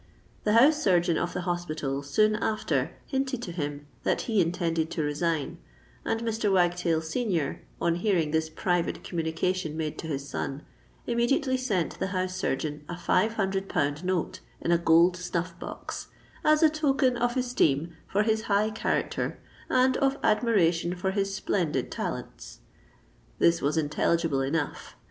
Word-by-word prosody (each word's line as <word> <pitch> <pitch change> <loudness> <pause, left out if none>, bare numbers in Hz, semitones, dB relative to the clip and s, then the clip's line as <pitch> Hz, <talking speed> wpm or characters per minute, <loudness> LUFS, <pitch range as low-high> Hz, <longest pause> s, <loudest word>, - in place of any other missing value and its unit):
The 210 - +3
house 290 +7 +6
surgeon 175 - +3
of 175 - -2
the 180 - -2
hospital 155 -6 -2
soon 215 +10 +2
after 215 -1 -1
hinted 265 -2 -2
to 180 - -5
him 145 -3 -4 0.2
that - - +1
he 220 -4 +2
intended 165 -2 0
to 160 - -2
resign; 150 0 -1 0.4
and 225 - -1
Mr. 225 -2 0
Wagtail 175 -3 +2
senior, 165 - -1 0.2
on 170 - +2
hearing 175 -4 +1
this 160 0 0
private 175 +1 -1
communication 165 0 -2
made 155 -2 -3
to 160 - -5
his 140 -2 -3
son, 140 +1 -4 0.4
immediately 260 +3 +1
sent 220 -10 -1
the - - 0
house 185 -1 -2
surgeon 150 -3 -2
a 175 - -4
five 185 +5 +2
hundred 195 -2 -1
pound 145 +3 0
note 185 -2 -1 0.2
in 170 - -1
a 170 - +4
gold 170 +2 +5
snuff 175 -1 -3
box, - - -6 0.4
"as 305 +1 +4
a 315 - +7
token 275 -4 +2
of 240 +1 0
esteem 170 - +1
for 205 +2 +1
his 220 0 0
high 210 +2 +3
character 215 - -1 0.3
and 255 0 +3
of 275 0 +2
admiration 180 -7 +2
for 190 +2 -1
his 195 0 0
splendid 180 -4 -1
talents." - - -6 0.8
This 170 0 +3
was 145 +3 0
intelligible 160 -1 +1
enough. 145 +3 -2
180 Hz, 155 wpm, -27 LUFS, 160-220 Hz, 0.8 s, a